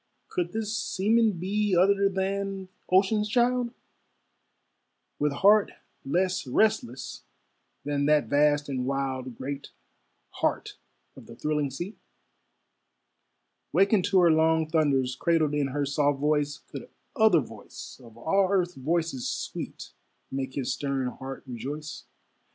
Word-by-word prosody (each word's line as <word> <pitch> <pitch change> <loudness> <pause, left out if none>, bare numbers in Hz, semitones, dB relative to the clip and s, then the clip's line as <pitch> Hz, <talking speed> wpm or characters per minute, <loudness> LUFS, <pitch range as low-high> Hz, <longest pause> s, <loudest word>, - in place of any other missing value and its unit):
Could 175 -1 -2
this 220 0 -2
seaman 225 0 +2
be 195 +3 0
Other 195 +2 +4
than 195 0 -2 0.2
ocean's 210 +3 +3
child, 245 +1 +2 1.5
With 150 0 +2
heart 200 +8 +4 0.3
less 180 +1 0
restless 130 - 0 0.6
than 145 0 0
that 150 -1 +4
vast 145 0 +2
and 130 -2 -2
wild 130 -2 -3
Great 140 +1 -5 0.7
heart - - -1 0.4
of - - -13
the 115 - -11
thrilling 150 +1 -1
sea? 175 - -6 1.7
Wakened 195 -1 +3
to 195 -2 +4
her 170 -2 +6
long 160 0 +3
thunders, 140 -5 +1
Cradled 160 -3 +1
in 145 -2 +1
her 140 +2 -1
soft 145 0 +1
voice, 150 0 +1
Could - - -10 0.3
other 220 - +5
voice 115 +2 -11
of 115 -1 -15
all 190 +10 +2
earth's 180 -3 +1
voices 155 -1 -1
sweet - - -5 0.4
Make 135 -1 -4
his 135 -3 -1
stern 135 -3 -2
heart 135 +2 -8
rejoice? 140 +5 -6
155 Hz, 120 wpm, -27 LUFS, 140-195 Hz, 1.7 s, her